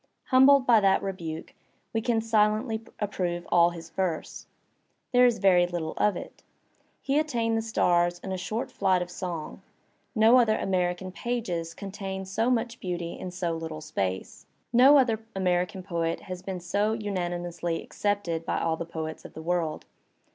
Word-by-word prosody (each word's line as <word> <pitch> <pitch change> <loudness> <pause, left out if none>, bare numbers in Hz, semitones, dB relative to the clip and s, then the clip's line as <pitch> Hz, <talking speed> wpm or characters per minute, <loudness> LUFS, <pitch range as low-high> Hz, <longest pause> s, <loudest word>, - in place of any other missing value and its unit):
Humbled 265 +1 +6
by 235 -3 +6
that 195 -2 +3
rebuke, 170 -5 -5 0.4
we 225 - 0
can 230 -1 +1
silently 220 +1 +1 0.2
approve 180 -4 -2
all 170 0 +6
his 165 -1 -10
verse. 180 -4 -3 0.6
There 250 -1 +6
is 235 -2 +1
veiy 180 -2 +4
Uttle 165 -3 -3
of 210 -2 +2
it; - - -9 0.6
he 275 +2 +2
attained 235 -7 0
the 225 - +1
stars 175 -5 +2
on 190 - -5
a - - -1
short 215 +6 -3
flight 185 -2 +2
of! 175 - -11
song; 175 -4 -5 0.5
no 225 +3 +6
other 225 -3 +3
American 185 0 -1
pages 180 -7 -3
contain 195 -1 -5
so 220 +6 0
much 235 -1 0
beauty 175 -2 -4
in 185 - -5
so 175 -2 -2
^ - - -12
little 160 -1 -5
space. 95 -12 -4 0.3
No 265 +5 +8
other 235 -5 +3 0.2
American 180 0 0
poet 170 -2 -2
has 185 -2 -7
been 185 -2 -5
so 205 +5 0
unani 185 -5 -2
mously 170 -1 -3
accepted 200 -6 -2
by - - -1
all 160 -1 0
the 170 - -4
poets 160 -1 -5
of - - -12
the 160 - -7
world. 165 -2 -1
185 Hz, 170 wpm, -27 LUFS, 175-220 Hz, 0.6 s, No